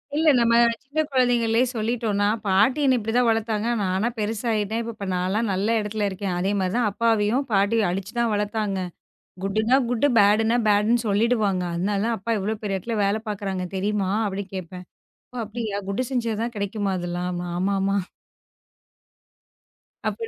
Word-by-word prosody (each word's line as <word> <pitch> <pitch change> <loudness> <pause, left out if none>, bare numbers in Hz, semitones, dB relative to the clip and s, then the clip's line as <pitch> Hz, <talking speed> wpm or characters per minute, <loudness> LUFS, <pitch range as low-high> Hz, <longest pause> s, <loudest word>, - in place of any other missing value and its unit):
இல்ல 315 +1 +4
நம்ம 230 -1 +3 0.3
சின்னக் 305 +3 -2
குழந்தைகளே 240 -2 +3
சொல்லிட்டோன்னா, 220 -2 0 0.2
பாட்டி 205 +8 +3
என்னய 260 -2 +4
இப்பிடி 225 +3 +1
வளத்தாங்க. 225 -1 0
நானா 190 +4 0
பெருசாயிதேன், 220 +1 -1
இப்ப 210 -2 -7
நான்லாம் 190 +5 0
நல்ல 205 +5 +1
இடத்துல 210 0 -2
இருக்கேன். 190 -1 -3
அதேமாரி 190 0 0
தான் 240 -3 +2
அப்பாவையும், 225 +3 +1
பாட்டி 205 +3 +3
அடிச்சிதான் 215 +6 -1
வளர்த்தாங்க. 210 -1 -1 0.7
குட் 195 +2 0
னா 260 - +7
குட், 245 +3 +2
பேடு 210 +2 +5
னா 240 - +3
பேடுன்னு 215 +3 +3
சொல்லிடுவாங்க. 205 -3 +1
அதனாலதான் 205 +5 0
அப்பா 230 +5 -2
இவ்ளோ 210 +3 -2
பெரிய 195 -2 -1
இடத்துல 225 +4 -4
வேல 205 +2 +1
பாக்குறாங்க 195 -3 -3
தெரியுமா? 200 0 0 0.2
அப்பிடி 200 0 -3
கேப்பேன். 180 0 -7 0.5
ஓ! - - -12
அப்பிடியா! 215 -2 -4
குட் 210 +6 -1
செஞ்சா 235 -3 0
தான் 235 0 -3
கெடைக்குமா 200 -1 -2
இதெல்லாம்? 175 0 -3 0.2
ஆமா, 190 +3 0
ஆமா. 195 +1 +1 2.1
அப்ப - - -3
210 Hz, 145 wpm, -24 LUFS, 195-230 Hz, 2.1 s, னா